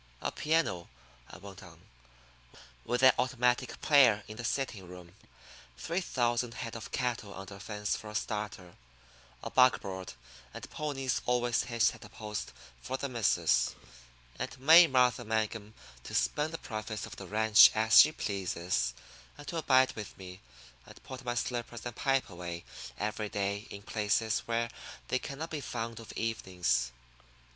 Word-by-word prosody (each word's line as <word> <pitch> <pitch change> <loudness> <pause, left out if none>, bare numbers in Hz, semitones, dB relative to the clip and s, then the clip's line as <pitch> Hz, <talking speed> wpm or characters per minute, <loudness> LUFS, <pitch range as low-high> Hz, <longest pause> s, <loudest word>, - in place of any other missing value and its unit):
A - - -2
piano," 150 - 0 0.4
I - - -11
went 100 -2 -11
on, 85 -3 -14 1.1
"with 125 +2 -1
an 130 - +9
automatic 125 -1 +1
player 125 -9 +5
in 110 - -8
the 115 - -6
sitting 115 -6 -2
room, 90 -1 -12 0.6
three 170 - -2
thousand 120 -5 -1
head 115 -3 -5
of 115 - -8
cattle 120 -5 -2
under 100 +1 -9
fence 105 +1 -3
for 110 - -8
a 105 - -9
starter, 105 -4 -4 0.7
a - - -5
buckboard 95 -8 +2 0.4
and - - -7
ponies 135 -4 -2
always 120 -1 +1
hitched 115 -2 +2
at - - -13
a 105 - -12
post 105 0 -6 0.3
for 130 - -3
'the 140 +1 -4
missus' 115 -5 +2 0.6
and - - -4
May 165 +5 +8
Martha 125 -3 +3
Mangum 110 -1 -2 0.3
to - - -6
spend 65 - +1
the 165 - -4
profits 110 -3 -5
of - - -10
the 95 - -8
ranch 110 +2 +7
as 110 +1 +8
she 155 - +4
pleases, 90 - -2 0.4
and 145 - -12
to 170 - -4
abide 130 -4 +4
with 105 -2 -8
me, 95 0 -10 0.5
and - - -15
put 130 0 -9
my 120 -1 -2
slippers 120 -1 -3
and 120 -2 -5
pipe 135 -1 +1
away 85 -2 -7 0.3
every 105 0 -3
day 100 +1 -2
in 100 0 -9
places 110 +1 0
where 115 0 -1 0.4
they 130 - +1
cannot 150 +5 -6
be 155 -2 -3
found 115 -2 -5
of 115 - -10
evenings. 90 - -1
115 Hz, 155 wpm, -31 LUFS, 100-125 Hz, 1.1 s, an